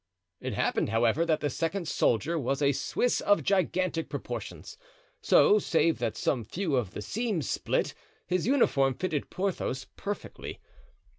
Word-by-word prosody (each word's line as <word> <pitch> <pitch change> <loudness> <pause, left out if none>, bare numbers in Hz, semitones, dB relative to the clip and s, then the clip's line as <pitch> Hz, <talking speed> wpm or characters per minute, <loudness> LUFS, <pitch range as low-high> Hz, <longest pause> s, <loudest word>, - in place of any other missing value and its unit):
It - - -4
happened, - - +1
however, 135 +9 +2
that 155 -2 +1
the 145 - 0
second 165 +4 -2
soldier 155 +6 +1
was 135 0 -1
a 140 -1 +3
Swiss 245 - 0
of 205 - +3
gigantic 185 -3 0
proportions, - - -6 0.5
so, 425 -3 +5
save 165 - +2
that 115 -2 -2
some 125 -1 0
few 165 - -2
of 115 -7 -1
the 105 - -4
seams 215 - -2
split, - - 0 0.3
his 180 +2 0
uniform 140 - +3
fitted 165 -4 -2
Porthos 185 -8 -2
perfectly. 205 +1 -6
165 Hz, 145 wpm, -29 LUFS, 135-190 Hz, 0.5 s, so